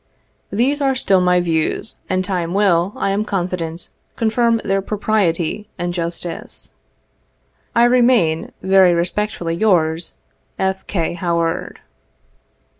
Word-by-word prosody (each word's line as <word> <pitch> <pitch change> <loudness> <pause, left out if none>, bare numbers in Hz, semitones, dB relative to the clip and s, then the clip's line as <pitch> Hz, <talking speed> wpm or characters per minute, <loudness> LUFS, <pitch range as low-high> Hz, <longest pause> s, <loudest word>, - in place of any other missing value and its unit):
These 265 +8 0
are 270 -1 +2
still 195 -7 +2
my 180 0 +3
views, 165 +4 -1
and 185 0 0
time 180 -2 -2
will, 190 -3 +3
I 195 - -1
am 200 +2 0
confident, 175 -4 -3 0.3
confirm 230 0 +2
their 195 0 +1
propriety 205 -2 -1
and 175 0 -2
justice. 170 0 -5 0.5
*' - - -42
I 235 - +5
remain, 240 -10 +3
very 190 -2 +5
respectfully 175 0 -2
yours, 170 -4 +1 0.2
" - - -44
F. 190 0 -13
K. 170 -5 -1
HOWAED. 170 -2 -2
185 Hz, 120 wpm, -19 LUFS, 170-210 Hz, 0.5 s, I